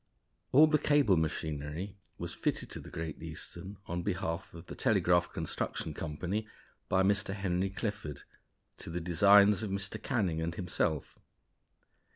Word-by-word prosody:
All 150 +4 +8
the 155 -1 +3
cable 145 -10 +4
machinery 80 +3 -2 0.2
was - - -4
fitted - - -2
to - - -5
the - - -10
Great 80 -2 -5
Eastern, 85 +4 -7
on 85 +1 -3
behalf 85 -4 -2
of 85 +1 -11
the - - -8
Telegraph 85 -1 +2
Construction - - -3
Company, 90 +8 -3 0.4
by 95 0 +4
Mr. 100 0 +2
Henry 95 -1 0
Clifford 95 - -4 0.6
to - - -7
the 85 +1 -2
designs 100 +4 +6
of 110 - -3
Mr. 95 0 -3
Canning 95 - 0
and 85 +1 -2
himself. 80 -4 -2
90 Hz, 145 wpm, -32 LUFS, 80-100 Hz, 0.6 s, All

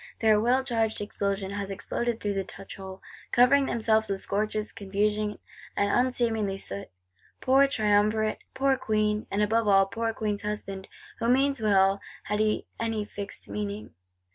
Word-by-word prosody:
Their 215 -2 +4
well 250 +4 +2
charged 225 -4 0
explosion 200 -1 -2
has 200 -1 -4
exploded 230 +4 -2
through 205 -1 -1
the 195 -1 -1
touch 195 +1 -10
hole; 190 -1 -9 0.3
covering 270 +3 +5
themselves 220 -1 +2
with 195 -1 -1
scorches, 215 +2 -1
confusion, 210 +1 -1 0.4
and 200 0 +2
unseemly 230 -5 +1
soot! 100 - -4 0.5
Poor 270 +2 +4
Triumvirate, 215 -2 +2 0.2
poor 270 0 +3
Queen; 215 -1 0
and 205 +2 +1
above 225 +1 +1
all, 195 -1 +6
poor 225 +3 -2
Queen's 210 -2 -2
Husband, 195 -2 -5 0.3
who 230 - 0
means 275 0 +3
well, 195 -2 +3 0.2
had 210 +1 -2
he 215 0 +1
any 225 -2 -1
fixed 200 -1 -6
meaning! 210 - -5
210 Hz, 150 wpm, -27 LUFS, 200-230 Hz, 0.5 s, all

